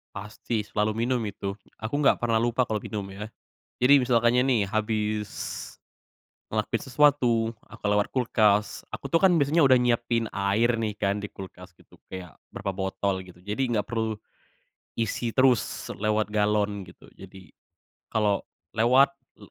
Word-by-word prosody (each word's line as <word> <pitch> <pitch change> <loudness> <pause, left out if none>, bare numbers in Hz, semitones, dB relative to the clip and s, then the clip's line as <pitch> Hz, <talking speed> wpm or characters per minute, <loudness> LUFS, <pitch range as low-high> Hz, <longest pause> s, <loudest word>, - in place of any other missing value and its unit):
Pasti 105 +3 -4
selalu 105 +1 0 0.2
minum 125 -3 0
itu, 100 -1 -4 0.2
aku 110 +5 -4
nggak - - +4
pernah 120 -1 +1
lupa 120 +2 +1
kalau 110 -2 -2
minum 105 -2 -5
ya. 105 +3 -8 0.5
Jadi 140 +2 +7
misalkannya 120 0 +3
nih, 120 -5 +3
habis 105 -1 -1 1.2
ngelakuin - - -1
sesuatu, 125 -5 +2 0.2
aku - - -15
lewat 105 0 +2
kulkas, 105 -4 +2
aku - - -7
tuh 165 - +4
kan 190 -1 +5
biasanya 150 0 +4
udah 130 - +6
nyiapin 120 -2 +1
air 110 +4 +1
nih 110 -2 -2
kan 100 0 -1
di 105 - -5
kulkas 90 -2 -11
gitu - - -22
kayak 90 -6 -9 0.2
berapa 100 -1 -3
botol 95 0 -2
gitu, 90 -1 -16
jadi 105 +7 -1
nggak 105 - +1
perlu 110 -1 -1 0.8
isi 115 +1 -1
terus 130 -3 +2
lewat 105 0 0
galon 105 -1 0
gitu. 85 - -16
Jadi 95 -2 -13 0.7
kalo 105 -2 +1 0.3
lewat, 125 +5 +5 0.3
l - - -14
110 Hz, 150 wpm, -26 LUFS, 100-120 Hz, 1.2 s, Jadi